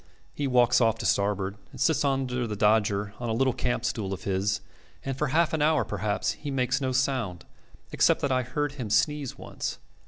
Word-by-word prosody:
He 145 - -2
walks 125 -1 +4
off 115 -1 +3
to - - -5
starboard, 100 -1 0
and - - -12
sits 160 -3 +2
under 130 -3 0
the 105 - -3
dodger 105 -1 +2
on 120 -1 -3
a - - 0
little 130 +2 +2
campstool 110 -5 -2
of 95 - -7
his, 100 +1 0 0.4
and 135 -1 -2
for 150 +3 0
half 160 +4 +2
an 155 - 0
hour 155 +1 +3
perhaps 105 0 -1
he 145 - -7
makes 130 -1 0
no 130 -1 0
sound, 125 - -1 0.5
except - - +3
that 140 - 0
I 130 0 +2
heard 140 +4 -2
him 125 -7 -6
sneeze 150 +3 +1
once. - - -5
125 Hz, 195 wpm, -27 LUFS, 105-135 Hz, 0.5 s, walks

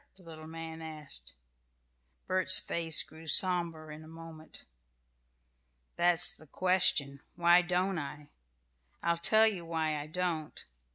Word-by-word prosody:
the 190 - -17
little 160 -2 -13
man 165 0 -9
asked. 150 - -3 0.9
Bert's 185 0 +6
face 165 -2 -1
grew 160 +1 -16
sober 165 -2 +3
in 150 +1 -11
a - - -15
moment. 165 -1 -14 1.3
"That's 175 0 0
the 155 - -17
question: 150 -6 -1
why 175 +1 +4
don't 180 +1 -2
I? 145 0 -9 0.7
I'll 170 0 -1
tell 215 +6 +3
you 200 -6 -2
why 160 -2 -3
I 145 - -8
don't. 165 -2 -5
165 Hz, 125 wpm, -29 LUFS, 155-180 Hz, 1.3 s, Bert's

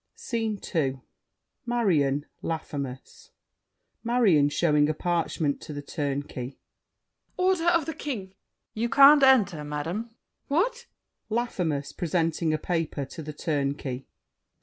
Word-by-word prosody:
SCENE 225 -4 -2
II 135 -6 0 0.6
Marion, 165 - +1 0.2
Laffemas 155 - -5 0.7
MARION 215 -12 +4
(showing 150 -1 +3
a 155 - 0
parchment 165 -3 -1
to 150 - -8
The 145 0 -6
Turnkey). 140 -3 -4 0.8
Order 365 -2 +2
of 335 -3 +4
the 320 - -3
King! 285 -5 -4
THE 190 - -9
TURNKEY. 190 - -33 0.5
You 235 - +1
can't 280 +3 +8
Enter, 220 - +4
madame. 150 +3 -3
MARION. 225 -1 -26 0.3
What! 475 - 0 0.4
LAFFEMAS 180 -11 -1
(presenting 165 -1 0
a 155 - +1
paper 165 -4 -2
to 160 +5 -9
The 150 0 -7
Turnkey). 140 -4 -2
165 Hz, 125 wpm, -27 LUFS, 145-240 Hz, 0.8 s, can't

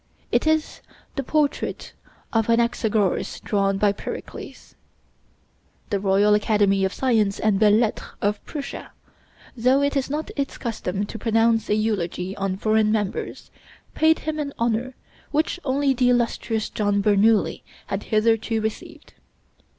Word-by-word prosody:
It - - +2
is 315 0 0 0.3
the 275 - -1
portrait 290 +2 -1 0.4
of 225 -2 +2
Anaxagoras 230 -4 +1
drawn 195 -1 0
by 205 0 +3
Pericles. 200 - -8 1.2
The 200 - +1
Royal 200 +1 +3
Academy 205 -2 +2
of 190 - +1
Sciences 220 -6 +1
and 210 -3 +2
Belles 210 0 +5
Lettres 230 -3 -1
of 205 +1 -1
Prussia, 285 -3 -7 0.6
though 255 +4 +3
it 285 +1 0
is 275 -1 0
not 300 +2 -3
its 280 -2 -3
custom 205 -4 -3
to 225 - -8
pronounce 225 0 +2
a 210 - +3
eulogy 195 -3 -2
on 195 -1 -2
foreign 215 +1 +2
members, 210 -3 -3 0.4
paid 320 0 +4
him 310 0 -4
an 285 -2 -3
honor 235 +2 -1 0.3
which 310 +4 0
only 275 0 +1
the 250 -1 +2
illustrious 230 -2 0
John 205 -1 0
Bernoulli 210 +1 +3 0.2
had - - -4
hitherto 225 0 +1
received. 220 0 -6
220 Hz, 135 wpm, -23 LUFS, 205-255 Hz, 1.2 s, Belles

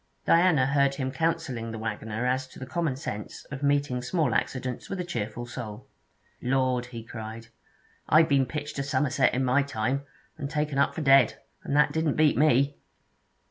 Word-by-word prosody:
Diana 165 -6 +4
heard 140 0 +2
him 130 -2 -2
counselling 140 -7 -2
the 115 - -5
waggoner 110 +1 -3
as 130 +1 0
to - - -15
the 130 - -6
common 145 +1 -1
sense 105 -5 -6
of 140 -1 -5
meeting 140 -3 +1
small 135 0 0
accidents 125 +3 -2
with 195 - -4
a - - -1
cheerful 120 -7 -4
soul. 115 -4 -7 0.6
'Lord!' 125 -1 +1
he 115 -2 -8
cried, 110 0 -8 0.6
'I 155 +2 +7
been 140 -4 +2
pitched 145 +1 -5
a - - 0
Somerset 135 -2 +2
in 130 +1 0
my 130 +3 +3
time, 135 0 -1 0.4
and 140 - -3
taken 150 -2 -1
up 140 - +2
for - - -3
dead, 135 -4 +5 0.3
and 140 - -2
that 150 0 +4
didn't 160 -1 0
beat 155 -1 +4
me!' 140 -1 +3
135 Hz, 180 wpm, -27 LUFS, 120-145 Hz, 0.6 s, I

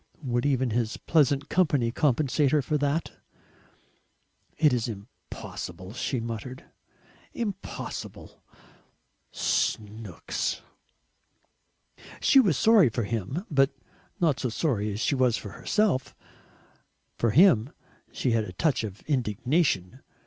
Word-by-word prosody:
Would 120 +1 0
even 130 -3 +1
his 115 0 -1
pleasant 145 -3 +2
company 145 -10 +2
compensate 145 +1 +2
her 150 0 +2
for 155 - -1
that? 145 +3 -1 1.5
"It 150 -4 +4
is 120 -1 0
impossible," 100 -3 -8
she 125 +1 -2
muttered; 115 +3 -6 0.7
"impossible! 205 -5 -6 0.9
SNOOKS!" 105 -3 -2 1.6
She 270 - +5
was 190 - +3
sorry 215 - +5
for 115 +1 -2
him, 115 - -3
but 135 -1 +2 0.4
not 155 -7 +2
so 130 - -1
sorry 110 -5 -1
as 100 - -5
she 130 - +1
was 130 -4 +2
for - - -7
herself. 200 -12 0 1.0
For 115 - +2
him 145 - +5 0.4
she 125 - -1
had 115 -2 +1
a 90 - -9
touch 145 - +1
of 105 -2 -7
indignation. 125 - 0
130 Hz, 115 wpm, -27 LUFS, 110-150 Hz, 1.6 s, She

